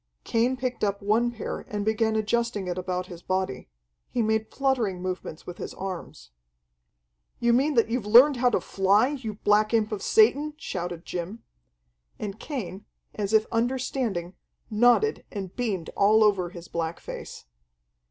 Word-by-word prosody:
Cain 240 +3 +1
picked 250 -2 -3
up 200 -1 +1
one 225 +4 +2
pair 240 -1 -5
and 205 -1 -3
began 220 0 +1
adjusting 220 -1 0
it 175 - -2
about 180 0 -3
his 175 -2 -10
body. 185 - -2 0.4
He 240 -2 0
made 220 0 0
fluttering 245 -9 0
movements 180 -3 -5
with 175 0 -8
his - - -6
arms. 175 - -7 1.1
"You 235 0 +3
mean 275 +4 +2
that 230 - +4
you've 230 -2 -2
learned 255 +6 +7
how 245 0 +3
to - - +1
fly, 200 +5 +3
you 250 -7 -5
black 210 +2 +2
imp 220 -1 +1
of 210 -2 -3
Satan?" 305 -9 +3
shouted 175 - -5
Jim. 180 +6 -5 0.7
And 210 0 -6
Cain, 205 - -5 0.3
as 205 -1 -3
if 220 0 +4
understanding, 230 -6 -1 0.4
nodded 245 - +3
and 195 -3 -6
beamed 205 -9 -2
all 215 +2 +5
over 195 -4 +2
his 175 -1 -10
black 165 0 -3
face. - - -8
215 Hz, 155 wpm, -26 LUFS, 185-240 Hz, 1.1 s, learned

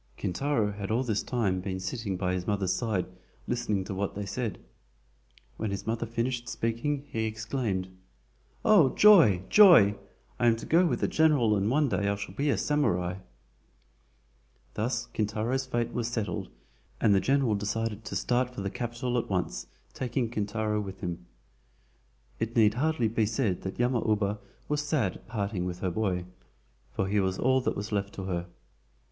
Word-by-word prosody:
Kintaro 110 +2 0
had 100 -1 -6
all 115 +4 +1
this 110 -5 0
time 100 -7 -1
been 95 0 -4
sitting 95 0 -3
by 90 0 -1
his 90 -1 -3
mother's 100 -3 +1
side 105 -3 -1 0.4
listening 105 -5 -1
to 95 - -5
what 100 +1 -3
they 100 0 -4
said. 110 0 -3 1.0
When 110 - -2
his 100 0 -4
mother 115 +1 -2
finished 120 +1 -2
speaking, 135 +6 -2
he 110 0 -2
exclaimed: 110 -3 -2 0.8
"Oh, 175 -12 +5
joy! 165 - +7
joy! 175 - +8 0.5
I 120 - +3
am 115 - +5
to 115 - -8
go 175 +3 +4
with - - -1
the - - +2
general 145 -9 +3
and 100 +1 +1
one 145 +3 +3
day 100 -5 0
I 100 - +1
shall 100 -2 -7
be 140 +8 0
a - - +2
SAMURAI!" 90 -11 0 1.5
Thus 115 +2 -1
Kintaro's 110 +5 -1
fate 120 -2 -1
was 120 -2 -1
settled, 115 -3 -3 0.5
and 110 -3 +4
the 100 - +5
general 135 -1 +2
decided 105 +1 -2
to 105 - -5
start 125 0 0
for - - -4
the 100 0 -3
Capital 120 +1 -2
at - - -5
once, 85 -11 -2 0.3
taking 120 -2 -2
Kintaro 105 0 -1
with 95 -2 -8
him. 85 -1 -5 1.1
It 115 +1 -3
need 110 -3 +5
hardly 150 -1 +1
be 110 -1 +1
said 110 -5 -1
that 95 - -5
Yama 120 -1 +1
uba 105 -1 +1 0.3
was 150 0 0
sad 145 - 0
at - - -23
parting 100 -4 -2
with 90 0 -5
her 95 - 0
boy, 90 -3 -1 0.7
for 95 - -1
he 105 +1 +1
was 95 -1 0
all 130 +1 +3
that - - -1
was 105 +2 -5
left 100 -1 -2
to 95 - -5
her. 90 -2 -3
110 Hz, 175 wpm, -28 LUFS, 100-125 Hz, 1.5 s, joy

